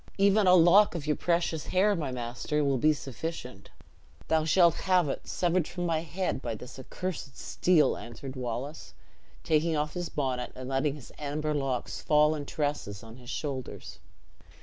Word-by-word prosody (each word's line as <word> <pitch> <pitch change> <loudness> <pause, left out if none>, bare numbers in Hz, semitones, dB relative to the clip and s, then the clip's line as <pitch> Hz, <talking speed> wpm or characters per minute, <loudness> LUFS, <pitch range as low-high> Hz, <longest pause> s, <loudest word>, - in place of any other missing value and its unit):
"Even 200 0 +4
a 180 - +8
lock 180 +4 +6
of 155 -4 -4
your 150 -1 +1
precious 170 -2 0
hair, 195 +3 +3
my 155 -6 -2
beloved 130 - -5
master, 125 +5 -2
will 135 -2 +1
be 155 +5 +5
sufficient." 135 - -6 0.6
"Thou 160 -1 +2
shalt 170 +1 +5 0.2
have 180 -4 +4
it, - - -4
severed 175 -2 +1
from 175 -1 -4
my 165 -2 +1
head 170 -3 -3
by 115 -3 -3
this 125 +5 -10
accurse 175 +3 -5
steel," 175 -4 +2
answered 130 +3 -8
Wallace, 130 +4 -5 0.5
taking 160 +1 +2
off 150 0 -1
his 175 -1 -3
bonnet, 130 -4 -2
and 130 0 -7
letting 135 +2 0
his 145 - -12
amber 150 +1 -2
locks 135 -4 -2
fall 150 0 +4
in 145 -2 -5
tresses 145 -9 -3
on 115 +1 -11
his 125 -1 -12
shoulders. 130 - -5
150 Hz, 170 wpm, -29 LUFS, 130-170 Hz, 0.6 s, a